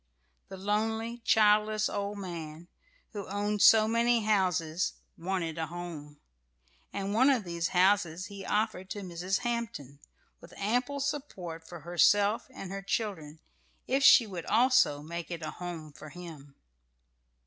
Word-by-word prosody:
The 190 - -8
lonely, 220 +4 -1
childless 215 0 +3
old 205 0 -3
man, 170 -3 -7 0.4
who 205 -2 -6
owned 205 +1 -2
so 220 -1 +7
many 235 +1 +2
houses, 180 -5 +1 0.2
wanted 170 -2 -3
a 160 - -2
home; 160 -4 -8 0.7
and 200 0 -3
one 255 +6 +5
of 255 -6 +2
these 170 -1 -2
houses 185 -2 +2
he 200 -1 -9
offered 210 -2 -1
to 205 - -5
Mrs. 185 +1 -2
Hampton, 230 - -4 0.4
with - - -15
ample 245 +7 -1
support 195 - -5
for 175 -2 -9
herself 200 +6 +3
and 195 -7 -8
her 195 0 -5
children, 195 -7 -3 0.5
if 270 +2 +1
she 250 -3 +8
would 185 -5 -7
also 230 - +3
make 170 +2 -6
it 170 -2 -6
a 155 - -4
home 165 -4 -7
for 155 - -11
him. 155 -5 -11
195 Hz, 140 wpm, -30 LUFS, 170-215 Hz, 0.7 s, she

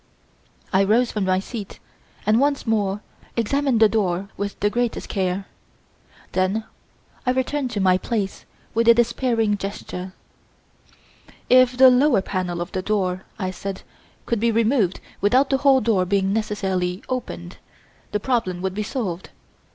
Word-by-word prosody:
I 190 +1 +5
rose 230 +5 +3
from 210 -3 -1
my 185 0 +2
seat 205 0 -7 0.5
and 215 +2 +4
once 280 +1 +1
more 205 -3 0 0.4
examined 265 +2 +1
the 220 - +7
door 195 -3 -1
with 200 0 -4
the 205 - +1
greatest 240 0 -1
care. 190 -1 -1 0.9
Then 190 +4 0 0.6
I 250 - -1
returned 260 +1 0
to 230 -4 -3
my 185 -1 +3
place 205 -4 -3 0.3
with 230 +1 +1
a 235 - +8
despairing 235 -3 +1
gesture. 190 -2 -6 1.4
"If 255 0 +6
the 260 0 +8
lower 250 -5 +4
panel 180 -3 -3
of 175 - -5
the 185 - -2
door," 185 -2 -1
I 185 -4 -2
said, 195 +1 -6 0.4
"could 235 - 0
be 230 +2 +2
removed 225 -4 +2 0.2
without 255 +7 +3
the 270 - +4
whole 270 -1 +4
door 210 -4 +2
being 195 +1 +1
necessarily 190 -4 -1
opened, 85 - -5 0.5
the 210 - 0
problem 200 -7 -1
would 190 -1 -1
be 210 - -3
solved. 200 -6 -4
210 Hz, 150 wpm, -22 LUFS, 190-240 Hz, 1.4 s, a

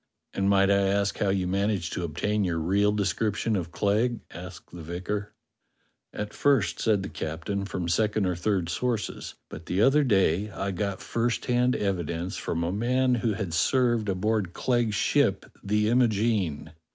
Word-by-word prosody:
"And 100 0 +1
might 100 0 +4
I 100 0 +3
ask 100 +1 0
how 100 - +1
you 95 -1 +1
managed 95 -2 -1
to 90 - -3
obtain 100 +6 -1
your 85 -3 -1
real 100 +6 +2
description 105 +2 0
of 85 -3 -3
Clegg 110 +6 0
.f^" - - -15
asked 90 +1 -10
the 90 - -8
vicar. 95 +5 -4 0.8
"At 105 0 -5
first," 140 -8 +2
said 105 -4 +2
the - - -4
captain, 90 +5 -4
"from 90 -3 -4
second 105 +4 +1
or 90 -1 0
third 90 0 0
sources; 115 +4 -3
but 80 +1 -10
the 95 +3 +1
other 145 +2 +5
day 100 - +2
I 100 -1 -3
got 100 0 -3
first 115 +1 -1
hand 125 0 +2
evidence 90 -3 -2
from 85 0 -2
a 85 - -1
man 125 +5 +1
who 115 -2 +1
had 100 -5 -4
served 120 +3 +2
aboard 95 -1 0
Clegg's 120 -4 0
ship, - - +2 0.2
the 105 +1 +1
Imogene. 110 - +1
100 Hz, 170 wpm, -27 LUFS, 90-110 Hz, 0.8 s, other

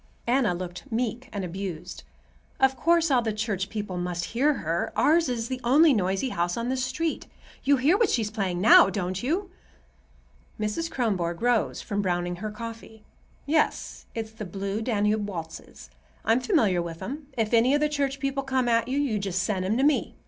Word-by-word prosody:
Anna 240 -6 +2
looked 180 +8 -7
meek 245 +2 -2
and 200 -3 -3
abused. 180 -1 -6 0.6
"Of 265 0 +4
course 330 +4 +2
all 250 -2 +4
the 225 -2 -1
church 210 -3 -2
people 205 -4 -4
must 175 -1 -2
hear 280 +5 +3
her. 165 -3 -2
Ours 320 -1 +3
is 235 -2 -2
the 255 0 -4
only 290 +5 +5
noisy 195 +3 0
house 175 -2 -1
on 235 +1 -2
this 260 -1 0
street. 300 +6 -2 0.4
You 280 0 +4
hear 285 +8 +3
what 460 - +3
she's 220 -4 0
playing 190 -5 -2
now, 200 -1 +8
don't 185 -1 -3
you?" 355 +9 -1 1.1
Mrs. 215 +11 -2
Kronborg 185 - -1
rose 240 -3 +1
from 205 0 -2
browning 175 -2 -1
her 215 +4 -4
coffee. 225 0 -9 0.4
"Yes; 310 +1 0
it's 220 -1 -4
the 220 -1 -8
Blue 195 +2 -4
Danube 210 -2 0
waltzes. 165 - -8 0.3
I'm 225 +3 +4
familiar 225 - +2
with 165 -1 -6
'em. 285 +2 -6
If 225 0 0
any 240 +4 +5
of - - +2
the 300 - +2
church 280 -2 -1
people 275 0 -1
come 265 -2 0
at 230 -1 +2
you, 265 +2 -1
you 250 -8 0
just 185 -2 -1
send 190 -3 -1
'em 215 +5 +1
to 265 - +2
me. 295 0 +2
225 Hz, 185 wpm, -26 LUFS, 195-265 Hz, 1.1 s, now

